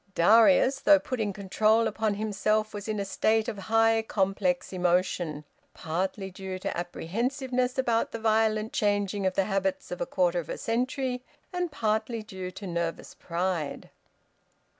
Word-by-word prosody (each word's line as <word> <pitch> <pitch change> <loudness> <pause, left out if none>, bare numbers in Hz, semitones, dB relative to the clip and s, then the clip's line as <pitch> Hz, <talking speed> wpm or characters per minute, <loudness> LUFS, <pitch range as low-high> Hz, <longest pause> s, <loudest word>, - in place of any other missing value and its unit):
Darius, 230 +8 +5
though 300 +1 +6
putting 230 -7 -2
control 215 +3 +2
upon 215 -1 -1
himself, 215 +1 0
was 205 0 -6
in 215 -1 -2
a 200 - -2
state 220 +3 +1
of 205 - -4
high 225 0 +4
complex 195 -4 -1
emotion, 175 -4 0 0.3
partly 190 +4 -3
due 190 0 -6
to 185 - -4
apprehensiveness 250 - -2
about 235 -3 +1
the - - -4
violent 220 -1 +1
changing 205 -1 +1
of 185 - -1
the 195 - +2
habits 195 -1 -1
of 180 - -5
a - - -1
quarter 180 -2 +1
of 160 - -7
a - - -3
century, 250 +2 -1 0.3
and 355 -2 -2
partly 220 -2 -1
due 190 -3 -6
to 195 +2 -9
nervous 170 -2 -3
pride. 170 -3 -3
210 Hz, 150 wpm, -28 LUFS, 185-225 Hz, 0.3 s, though